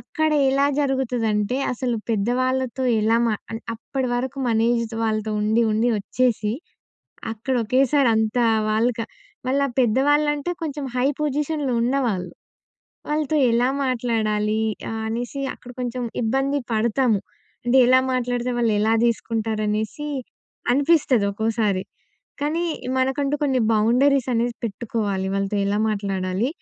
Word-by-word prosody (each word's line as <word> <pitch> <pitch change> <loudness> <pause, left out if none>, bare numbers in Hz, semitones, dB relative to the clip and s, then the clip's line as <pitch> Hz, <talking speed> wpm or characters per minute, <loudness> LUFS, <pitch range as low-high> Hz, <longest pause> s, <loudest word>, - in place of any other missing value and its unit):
అక్కడ 315 -1 -1 0.2
ఎలా 275 +1 +3
జరుగుతదంటే, 245 -5 0 0.2
అసలు 245 -1 -2
పెద్దవాళ్ళతో 255 +3 0 0.2
ఎలా 225 +2 +3
మా 220 - +1 0.2
ఆహ్, 225 - -4
అప్పటి 255 +3 -3
వరకు 260 +2 -3
మన 225 -1 +2
ఏజ్ 230 -1 -1
వాళ్ళతో 215 -1 -1
ఉండి, 220 +2 +2
ఉండి 230 +3 +2
వచ్చేసి, 220 -1 0 0.8
అక్కడ 245 +4 -3
ఒకేసారి 260 +2 +3
అంత 220 +2 0 0.3
వాళ్ళక 230 +2 +1 0.5
వాళ్ళ 280 +2 +2 0.2
పెద్దవాళ్ళంటే, 290 +6 +2
కొంచెం 290 -2 -3
హై 255 +2 +2
పొజిషన్‍లో 295 -1 -1
ఉన్నవాళ్ళు. 235 -8 0 0.8
వాళ్ళతో 305 0 0 0.2
ఎలా 245 +2 +3 0.2
మాట్లాడాలి, 220 -4 0 0.3
ఆహ్, 225 0 -3
అనేసి 245 +5 -3
అక్కడ 245 - -13
కొంచెం 250 0 -3 0.2
ఇబ్బంది 270 +5 +1
పడతాము. 220 -1 +2 0.4
అంటే 245 +2 +3
ఎలా 255 +1 +6
మాట్లాడితే 245 0 -1
వాళ్ళు 230 -2 +2
ఎలా 220 +1 +2
తీసుకుంటారనేసి 220 +2 -1 0.7
అనిపిస్తది 275 -5 +3
ఒకోసారి. 215 -3 0 0.6
కానీ, 310 +4 0 0.4
మనకంటూ 275 +2 0
కొన్ని 265 -3 +2
బౌండరీసనేసి 240 +1 +2
పెట్టుకోవాలి, 205 -3 -2
వాళ్ళతో 195 +1 -1
ఎలా 205 +1 0
మాట్లాడాలి, 195 +1 -1
240 Hz, 115 wpm, -23 LUFS, 220-265 Hz, 0.8 s, ఎలా